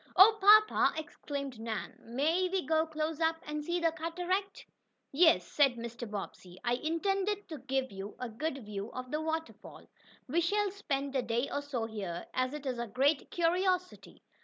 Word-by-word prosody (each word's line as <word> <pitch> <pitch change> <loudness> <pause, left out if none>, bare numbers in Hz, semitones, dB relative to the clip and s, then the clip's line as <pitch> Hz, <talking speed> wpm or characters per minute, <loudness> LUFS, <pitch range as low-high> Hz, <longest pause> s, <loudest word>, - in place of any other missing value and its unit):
"Oh, 425 +3 +8 0.3
papa!" 375 - +1
exclaimed 280 -4 -6
Nan. 225 -3 -4
"May 315 +10 0
we 380 -1 -1
go 320 0 +2
close 310 0 -3
up 325 0 +3
and 300 0 -4
see 345 +3 -1
the 330 -1 +2
cataract?" 355 +5 -3 0.5
"Yes," 320 +3 +5
said 275 -4 +3
Mr. 235 0 -6
Bobbsey. 190 -3 -7
"I 240 -1 +1
intended 390 +8 -1
to 310 -3 -6
give 265 0 -2
you 195 +1 -7
a 250 - -3
good 270 +2 -4
view 205 +1 -5
of 255 0 -6
the 305 +1 -1
waterfall. 320 0 -5 0.4
We 320 +6 +1
shall 405 +3 +1
spend 280 -8 -3
a 260 - +3
day 235 +2 -1
or 285 - -1
so 270 -6 -3
here, 195 -6 -5
as 255 +2 0
it 295 -1 -8
is 255 -3 -2
a 235 - -2
great 275 +7 +1
curiosity. 365 +2 0
295 Hz, 175 wpm, -32 LUFS, 245-335 Hz, 0.5 s, Oh